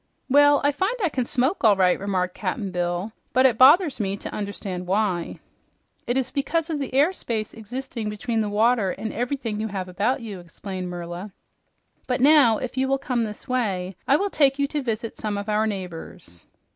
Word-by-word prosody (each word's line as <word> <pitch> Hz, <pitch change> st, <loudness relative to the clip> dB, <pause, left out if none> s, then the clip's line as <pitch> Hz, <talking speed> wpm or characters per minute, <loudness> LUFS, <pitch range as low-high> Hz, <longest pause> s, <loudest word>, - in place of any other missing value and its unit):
"Well, 290 Hz, +1 st, +6 dB
I 285 Hz, -, +4 dB
find 380 Hz, -, -1 dB
I 350 Hz, -, +3 dB
can 255 Hz, -4 st, -2 dB
smoke, 260 Hz, +9 st, 0 dB
all 215 Hz, -3 st, +6 dB
right," 185 Hz, -2 st, +3 dB
remarked 185 Hz, -2 st, -1 dB
Cap'n 195 Hz, 0 st, -3 dB
Bill, 175 Hz, +3 st, -2 dB, 0.2 s
"but 255 Hz, +2 st, +4 dB
it 240 Hz, -4 st, +3 dB
bothers 290 Hz, +3 st, +6 dB
me 195 Hz, -1 st, -1 dB
to -, -, -7 dB
understand 200 Hz, -3 st, -5 dB
why." 190 Hz, -3 st, 0 dB, 0.7 s
"It 245 Hz, -, +1 dB
is 265 Hz, -1 st, -1 dB
because 330 Hz, +4 st, -1 dB
of 300 Hz, -, -2 dB
the 275 Hz, -, -4 dB
air 300 Hz, +7 st, +4 dB
space 220 Hz, -, -4 dB
existing 230 Hz, 0 st, -5 dB
between 220 Hz, +2 st, -2 dB
the 210 Hz, -, -1 dB
water 220 Hz, 0 st, +2 dB
and 220 Hz, +4 st, -4 dB
everything 240 Hz, -3 st, -2 dB
you 220 Hz, -, -1 dB
have 190 Hz, -3 st, -4 dB
about 210 Hz, +9 st, 0 dB
you," 205 Hz, -5 st, -6 dB
explained 180 Hz, +1 st, -7 dB
Merla. 175 Hz, +3 st, -6 dB, 0.7 s
"But 250 Hz, -1 st, 0 dB
now, 270 Hz, -5 st, +6 dB
if 255 Hz, +3 st, -6 dB
you 265 Hz, 0 st, +2 dB
will 270 Hz, 0 st, +2 dB
come 250 Hz, -4 st, -1 dB
this 210 Hz, +4 st, -9 dB
way, 195 Hz, -8 st, -1 dB
I 275 Hz, -, +5 dB
will 400 Hz, +5 st, 0 dB
take 275 Hz, -2 st, +3 dB
you 280 Hz, -, +2 dB
to 295 Hz, -1 st, -1 dB
visit 230 Hz, -2 st, -4 dB
some 210 Hz, -1 st, -2 dB
of 200 Hz, +1 st, -5 dB
our 215 Hz, +1 st, +1 dB
neighbors." 180 Hz, -, -7 dB
220 Hz, 195 wpm, -24 LUFS, 195-265 Hz, 0.7 s, Well